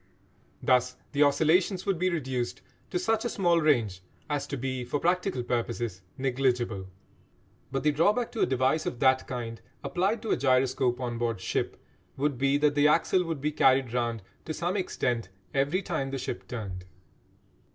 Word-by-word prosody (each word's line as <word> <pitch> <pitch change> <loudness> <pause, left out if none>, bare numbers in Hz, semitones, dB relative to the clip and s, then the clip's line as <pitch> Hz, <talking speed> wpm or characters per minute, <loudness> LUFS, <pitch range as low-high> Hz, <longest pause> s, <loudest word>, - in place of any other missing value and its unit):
Thus 125 0 +3
the 145 - 0
oscillations 160 +6 +3
would 195 -4 0
be 185 +1 +2
reduced 130 -8 -2 0.3
to - - -1
such 220 +4 +1
a 240 - -1
small 175 -5 +2
range 115 -12 +2 0.3
as 145 -1 -1
to 140 - -4
be 130 0 -3
for 125 +4 -2
practical 180 -5 0
purposes 120 -5 -2 0.2
negligible. 125 -6 0 0.8
But 135 0 -2
the 150 - +4
drawback 205 +11 +2
to 225 - -6
a - - +4
device 130 +4 +1
of 120 - -4
that 130 0 +3
kind, 115 -3 -5 0.2
applied 200 +6 0
to 225 - -2
a - - +3
gyroscope 130 -1 +2
on 120 -2 -3
board 115 -4 -1
ship, - - -2 0.4
would 140 -2 0
be 140 +1 +3
that 145 0 +3
the 145 0 +4
axle 170 +4 +3
would 165 -4 -3
be 150 +1 0
carried 130 -4 +3
round 120 -3 -1 0.2
to 155 - -4
some 175 +3 -1
extent 120 - -1 0.2
every 145 +8 +1
time 150 -7 -2
the 135 - -3
ship 130 - -5
turned. 95 -7 -6
135 Hz, 170 wpm, -28 LUFS, 125-165 Hz, 0.8 s, the